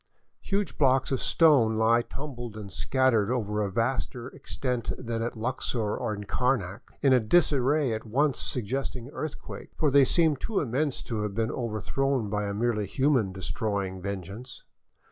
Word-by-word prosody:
Huge 200 Hz, -2 st, -2 dB
blocks 135 Hz, -2 st, +3 dB
of 135 Hz, -, 0 dB
stone 135 Hz, -10 st, +4 dB
lie 115 Hz, +2 st, +4 dB
tumbled 120 Hz, -4 st, -7 dB
and 100 Hz, -2 st, -8 dB
scattered 120 Hz, -3 st, +2 dB
over 105 Hz, -4 st, -1 dB
a 100 Hz, -, 0 dB
vaster 120 Hz, +2 st, -2 dB
extent 125 Hz, -4 st, -3 dB
than 115 Hz, -2 st, -3 dB
at 120 Hz, +2 st, -3 dB
Luxor 115 Hz, -2 st, -2 dB
and 105 Hz, -4 st, -4 dB
Karnak, 115 Hz, -5 st, 0 dB, 0.2 s
in 135 Hz, -2 st, +5 dB
a 130 Hz, -, +6 dB
disarray 140 Hz, +1 st, +3 dB
at 110 Hz, +1 st, -5 dB
once 135 Hz, +4 st, +1 dB
suggesting 125 Hz, +1 st, -1 dB
earthquake; 155 Hz, -1 st, -7 dB
for 150 Hz, -3 st, +2 dB
they 140 Hz, 0 st, +7 dB
seem 160 Hz, 0 st, +3 dB
too 210 Hz, -, -1 dB
immense 135 Hz, +2 st, -1 dB
to 110 Hz, -3 st, -3 dB
have 105 Hz, -2 st, -3 dB
been 115 Hz, 0 st, 0 dB
over 115 Hz, -3 st, -3 dB
thrown 135 Hz, 0 st, -1 dB
by 105 Hz, 0 st, -1 dB
a 100 Hz, -, -2 dB
merely 105 Hz, -2 st, 0 dB
human 130 Hz, -4 st, +2 dB
destroying 95 Hz, 0 st, -3 dB
vengeance. 100 Hz, +6 st, -6 dB
120 Hz, 160 wpm, -27 LUFS, 105-135 Hz, 0.2 s, they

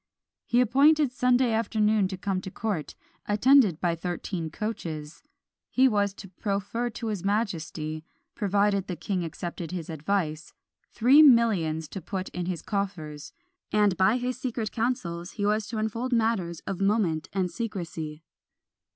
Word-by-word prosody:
He 245 Hz, -, +4 dB
appointed 280 Hz, +4 st, +4 dB
Sunday 250 Hz, -1 st, +2 dB
afternoon 215 Hz, -2 st, +2 dB
to 190 Hz, 0 st, -6 dB
come 190 Hz, -1 st, -2 dB
to 190 Hz, -, -6 dB
court, 195 Hz, -6 st, -3 dB, 0.3 s
attended 210 Hz, -, +5 dB
by 175 Hz, -2 st, +1 dB
thirteen 175 Hz, 0 st, -4 dB
coaches. 160 Hz, -6 st, -5 dB, 0.5 s
He 260 Hz, +1 st, +4 dB
was 205 Hz, -4 st, +2 dB
to 195 Hz, -, -10 dB
proffer 200 Hz, +5 st, -2 dB
to 230 Hz, 0 st, -6 dB
his 205 Hz, -5 st, -3 dB
majesty, 165 Hz, -7 st, -2 dB, 0.3 s
provided 200 Hz, -1 st, +1 dB
the 180 Hz, -, -3 dB
king 180 Hz, +2 st, -2 dB
accepted 170 Hz, 0 st, -5 dB
his 175 Hz, -3 st, -5 dB
advice, 155 Hz, -1 st, -2 dB, 0.4 s
three 260 Hz, +6 st, +6 dB
millions 205 Hz, -, +4 dB
to 195 Hz, -, -6 dB
put 190 Hz, +2 st, -4 dB
into 180 Hz, 0 st, -4 dB
his 175 Hz, -3 st, -4 dB
coffers; 185 Hz, -, -4 dB, 0.4 s
and 210 Hz, -3 st, +3 dB
by 190 Hz, +6 st, +3 dB
his 250 Hz, 0 st, -3 dB
secret 230 Hz, -4 st, -3 dB
councils 185 Hz, -8 st, -2 dB
he 205 Hz, -3 st, -2 dB
was 210 Hz, 0 st, +1 dB
to 230 Hz, -, -5 dB
unfold 230 Hz, +4 st, -2 dB
matters 220 Hz, -8 st, 0 dB
of 195 Hz, -1 st, -5 dB
moment 195 Hz, -6 st, +1 dB
and 185 Hz, -2 st, -1 dB
secrecy. 170 Hz, -9 st, -5 dB
200 Hz, 145 wpm, -27 LUFS, 170-230 Hz, 0.5 s, three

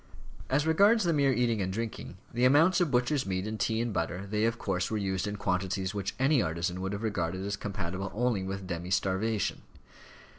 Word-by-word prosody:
As 145 Hz, +3 st, +2 dB
regards 200 Hz, +8 st, +5 dB
the 170 Hz, -2 st, +2 dB
mere 140 Hz, -2 st, +3 dB
eating 120 Hz, -3 st, +1 dB
and 95 Hz, 0 st, -1 dB
drinking, 115 Hz, +3 st, -5 dB, 0.2 s
the 120 Hz, +1 st, 0 dB
amounts 160 Hz, +8 st, +5 dB
of 175 Hz, -, +2 dB
butcher's 125 Hz, 0 st, +1 dB
meat 95 Hz, 0 st, -1 dB
and 110 Hz, 0 st, -4 dB
tea 110 Hz, +3 st, +1 dB
and 120 Hz, -2 st, -1 dB
butter, 90 Hz, +2 st, -2 dB
they 105 Hz, +2 st, 0 dB
of 115 Hz, 0 st, 0 dB
course 90 Hz, -4 st, -1 dB
were 110 Hz, -, -1 dB
used 95 Hz, -1 st, -1 dB
in 105 Hz, -, -3 dB
quantities 95 Hz, 0 st, -1 dB
which 100 Hz, -2 st, -3 dB
any 135 Hz, 0 st, +3 dB
artisan 85 Hz, +1 st, -2 dB
would 95 Hz, +1 st, -2 dB
have 100 Hz, +2 st, -4 dB
regarded 95 Hz, -3 st, -2 dB
as 100 Hz, 0 st, -2 dB
compatible 95 Hz, -2 st, -4 dB
only 120 Hz, -3 st, +1 dB
with 95 Hz, 0 st, -4 dB
demi 85 Hz, 0 st, -4 dB
starvation. 100 Hz, +3 st, 0 dB
105 Hz, 200 wpm, -29 LUFS, 95-125 Hz, 0.2 s, regards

